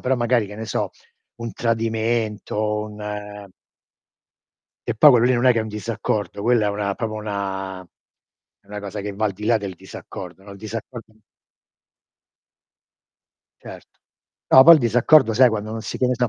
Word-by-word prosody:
però 130 +1 0
magari, 120 -2 +1
che 105 - -10
ne 110 +2 -6
so, - - -3 0.5
un 115 -1 -5
tradimento, 110 -2 -1
un, 105 0 -10
ehm 105 -2 -7 1.3
E 120 -2 -2
poi 150 +5 +8
quello 120 -2 +4
lì 130 - +3
non 120 +2 +1
è 125 - +7
che 115 - 0
è - - -1
un 110 - -7
disaccordo, 105 -2 -3
quella 115 -3 +2
è - - +1
una 100 -1 -2
proprio 110 -2 -4
una 95 -3 -5
è 90 +2 -33
una 105 0 -7
cosa 100 +1 -6
che 100 0 -5
va 110 +2 -2
al 100 - -2
di 105 +3 -9
là 115 +1 +3
del 100 -3 -5
disaccordo, 90 +1 -10
no, 100 - -13
il - - -11
disaccordo 110 +2 -8 2.5
Certo. - - -13 0.5
No, 130 - +8
poi 170 +1 +10
il 155 - +2
disaccordo, 120 +3 +4
sai, 125 +3 +5
quando 110 -1 -4
non 110 0 -5
si - - -5
pensa 125 -1 +1
110 Hz, 175 wpm, -21 LUFS, 105-120 Hz, 2.5 s, poi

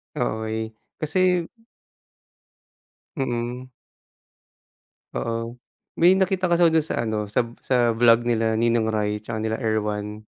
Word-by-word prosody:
Okey, 110 0 -3 0.2
kasi 180 +2 +2 1.7
Mm. 125 -1 -3 1.4
Oo, 115 +1 -4 0.4
may 180 +3 +6
nakita 190 -1 +1
kasi 175 0 +3
ako 165 - +5
dun 160 -1 +2
sa - - -2
ano 110 -1 -2
sa 105 +4 +1 0.2
sa 120 -3 +2
vlog 115 +1 +4
nila 115 -2 +1
Ninong 115 -1 +2
Ry 105 -1 -1
tsaka 110 0 -5
nila 110 0 -2
Erwan. 105 -1 -2
115 Hz, 115 wpm, -24 LUFS, 110-135 Hz, 1.7 s, may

